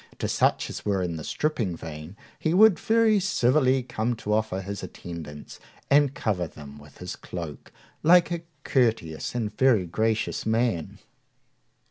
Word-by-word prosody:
To - - -2
such - - +1
as - - -7
were 100 -3 0
in 85 -2 -3
the 80 - -7
stripping 115 - -1
vein 80 +4 -9 0.2
he 160 +2 0
would 205 -4 +6
very 225 -2 +3
civilly 130 -7 +2
come 120 -1 -2
to 105 -2 -3
offer 110 -3 0
his 100 +1 -6
attendance, 80 -4 -9 0.3
and 140 -1 +4
cover 90 -6 -1
them 75 -2 -12
with 75 0 -16
his - - -6
cloak, 85 -6 -8 0.3
like 175 +1 +5
a 170 -1 -2 0.2
courteous 115 - 0
and 110 -3 -2
very 120 -8 +3
gracious 110 +5 -1
man. 110 -6 0
110 Hz, 150 wpm, -26 LUFS, 85-135 Hz, 0.3 s, would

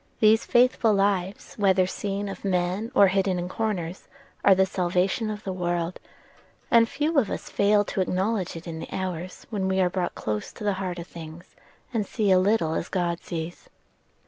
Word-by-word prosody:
These 220 +1 +5
faithful 240 -3 +4
lives, 195 -1 0
whether 190 -2 +4
seen 200 +2 -3
of 195 - -7
men 190 +4 -1
or 200 - +8
hidden 190 -1 +1
in 175 0 -3
corners, 185 -4 -3 0.4
are 195 - +7
the 190 +1 +4
salvation 185 +4 0
of 210 0 -5
the 190 - -3
world, 175 -1 -2 0.7
and 230 -1 +6
few 300 +2 +1
of 225 - 0
us - - -5
fail 205 0 +3
to 195 - -2
acknowledge 190 +1 -1
it 165 - -8
in 165 -2 -6
the - - -7
hours 185 -1 -5
when 195 -3 -1
we 190 0 +1
are 180 -1 +2
brought 180 -1 -2
close 105 -1 -3
to - - -9
the 205 -1 +1
heart 180 -2 -3
of 170 - -6
things, 165 0 -11 0.4
and 215 -4 -1
see 210 -4 +1
a 185 - +6
little 185 -4 +2
as 165 - -3
God 175 -2 -1
sees." 165 0 -6
190 Hz, 190 wpm, -26 LUFS, 175-205 Hz, 0.7 s, or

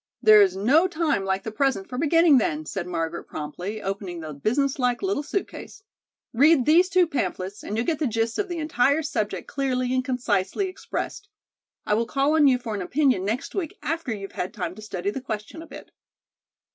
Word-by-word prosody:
"There 430 -1 +7
is 390 -2 +3
no 275 - +4
time 320 - 0
like 190 0 -1
the 220 - -5
present 235 -4 0
for 250 - -7
beginning, 325 -2 +5
then," 155 -7 -2
said 180 +2 -4
Margaret 165 -1 -3
promptly, 180 +8 -6
opening 195 -3 -4
the 155 -2 -7
business 265 - 0
like 250 +2 0
little 385 -6 0
suit 340 +7 -2
case. 405 - -11 0.5
"Read 280 +2 +5
these 345 +4 +5
two 365 -1 +4
pamphlets 195 - -3
and 210 - -4
you'll 230 - 0
get 320 -3 -1
the 305 - +1
gist 225 0 -1
of 400 -2 -1
the 350 - -3
entire 305 -1 +1
subject 210 - -3
clearly 255 -2 -1
and 255 0 +1
concisely 250 - -1
expressed. 395 +2 -6 0.6
I - - +1
will 230 +2 +1
call 275 +3 +1
on 310 -2 +5
you 260 -2 +4
for 240 -3 -6
an 205 - -3
opinion 255 -1 +1
next 230 +8 -3
week 360 -6 -4
after 325 -4 -2
you've 195 -3 -5
had 180 - -5
time 170 - -3
to 215 - -12
study 200 -2 -3
the 265 - -5
question 220 +5 -6
a 330 - -11
bit." - - -12
250 Hz, 205 wpm, -25 LUFS, 200-310 Hz, 0.6 s, There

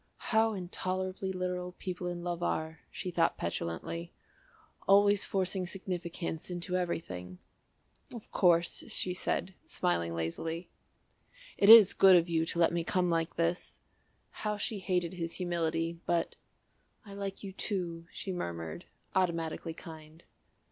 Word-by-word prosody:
"How 220 0 +4
intolerably 185 0 -3
literal 180 -1 -3
people 180 -1 -5
in 175 -1 -4
love 175 -1 -3
are," 160 -2 -2
she 180 - -5
thought 165 -1 +2
petulantly; 85 - -4 0.8
"always 200 0 +5
forcing 185 -1 -1
significance 175 -3 -4
into 180 +1 -2
everything." 90 - -3 0.7
"Of 235 -3 -10
course," 170 -2 +3
she 180 - 0
said, 185 +1 -2
smiling 85 - 0
lazily. 160 - -3 0.9
"It 200 - +4
is 220 -4 +11
good 190 -1 +7
of 170 0 +4
you 165 -1 +1
to 170 - -2
let 170 0 +4
me 170 -1 0
come 180 +1 +1
like 165 -1 0
this." 170 +1 -1 0.6
How 210 -1 -1
she 210 0 -2
hated 180 -2 0
his 170 -2 -3
humility, 165 -2 -1
but 170 -1 0 0.7
"I 200 - -10
like 200 0 -5
you 195 -1 -6
to," 175 -5 -3
she 195 - -5
murmured, 85 - -5 0.3
automatically 165 -2 -1
kind. 160 0 -11
175 Hz, 135 wpm, -31 LUFS, 165-185 Hz, 0.9 s, is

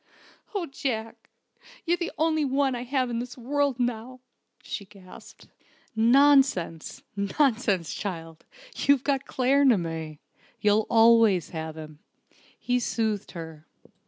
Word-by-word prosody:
"Oh, 380 -4 -1
Jack, 235 -6 -5 0.6
you're 345 0 +2
the 345 -1 -4
only 315 0 +1
one 275 -1 +1
I 240 - -4
have 255 -1 -1
in 230 - -2
the 245 +1 -6
world 280 +1 -1
now!" 245 +1 -3 0.4
she 205 - -6
gasped. 190 -2 -15 0.5
"Nonsense, 240 - +3
nonsense, 205 - 0
child. 165 -5 -6 0.3
You've 280 -2 +2
got 275 -1 -1
Claremanagh. 195 - +1 0.4
You'll 210 +1 +2
always 225 -5 +5
have 160 -1 -6
him," 155 -1 -10 0.6
he 250 0 0
soothed 220 -4 -2
her. 160 -3 -9
230 Hz, 115 wpm, -26 LUFS, 185-270 Hz, 0.6 s, always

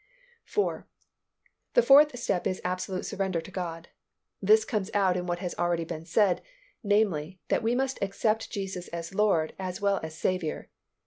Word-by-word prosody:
4. 415 - -1 0.9
The - - +6
fourth 285 -1 +7
step 180 -6 0
is 185 - -2
absolute 185 +1 -2
surrender 190 -3 -1
to 175 - -10
God. 170 -3 -5 0.5
This 215 +2 +5
comes 210 -5 -2
out 190 -3 +3
in 180 0 -3
what 175 0 -1
has 180 -1 -4
been - - -2
already 165 -2 -2
said, 195 -1 +2 0.4
namely, 195 -6 +1
that - - +2
we 230 +2 +1
must 265 +1 -1
accept 215 +3 0
Jesus 190 -3 -5
as 170 +1 -6
Lord 190 -6 +2
as 185 -1 -4
well 200 -1 +2
as 160 0 -7
Saviour. 180 -4 -2
190 Hz, 165 wpm, -28 LUFS, 175-210 Hz, 0.9 s, fourth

